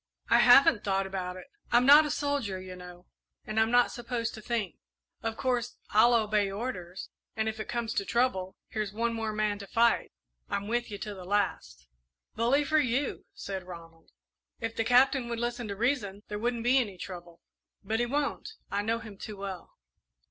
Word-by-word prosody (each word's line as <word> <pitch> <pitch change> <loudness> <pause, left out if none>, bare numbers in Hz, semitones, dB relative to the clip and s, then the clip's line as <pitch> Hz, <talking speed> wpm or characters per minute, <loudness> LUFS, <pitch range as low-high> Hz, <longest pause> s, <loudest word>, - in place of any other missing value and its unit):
"I 235 - +7
haven't 245 -2 +7
thought 195 -1 0
about 185 -1 -4
it. 185 - -10 0.3
I'm 240 +1 +5
not 295 +3 +8
a - - -4
soldier, 285 -10 -1
you 185 0 -8
know, 180 0 -12 0.4
and 215 +1 -1
I'm 220 0 +3
not 245 0 +4
supposed 235 -1 -3
to 215 - -9
think. 215 -5 -2 0.4
Of 225 -1 -3
course, 245 -2 -1 0.2
I'll 235 +3 +6
obey 210 -3 +2
orders, 195 -4 -5 0.3
and 220 0 -1
if 220 0 -3
it 215 - -5
comes 235 -1 -2
to 200 - 0
trouble, 195 -5 0
here's 215 -2 -3
one 230 +2 0
more 225 -1 -2
man 210 -1 -1
to 200 - -8
fight 235 +2 +2 0.4
I'm 200 0 -2
with 240 +2 -1
you 205 - -5
to 210 +1 -6
the 190 -2 -9
last." 180 - -2 0.5
"Bully 245 +6 +2
for 310 +2 +2
you!" 265 0 -1
said 195 -1 -5
Ronald. 165 -2 -12 0.5
"If 225 - -4
the 225 - 0
Captain 250 +1 +4
would 235 -1 -3
listen 240 0 -3
to 200 - -4
reason, 210 -4 -1
there 210 0 -4
wouldn't 235 0 -1
be 255 +3 +4
any 205 -7 -3
trouble; 175 -2 -9 0.4
but 220 +3 -1
he 240 - +1
won't 290 - -2 0.2
I 200 - 0
know 225 +2 0
him 215 -4 -11
too 210 -2 -7
well." 195 -3 -7
220 Hz, 190 wpm, -29 LUFS, 195-240 Hz, 0.5 s, not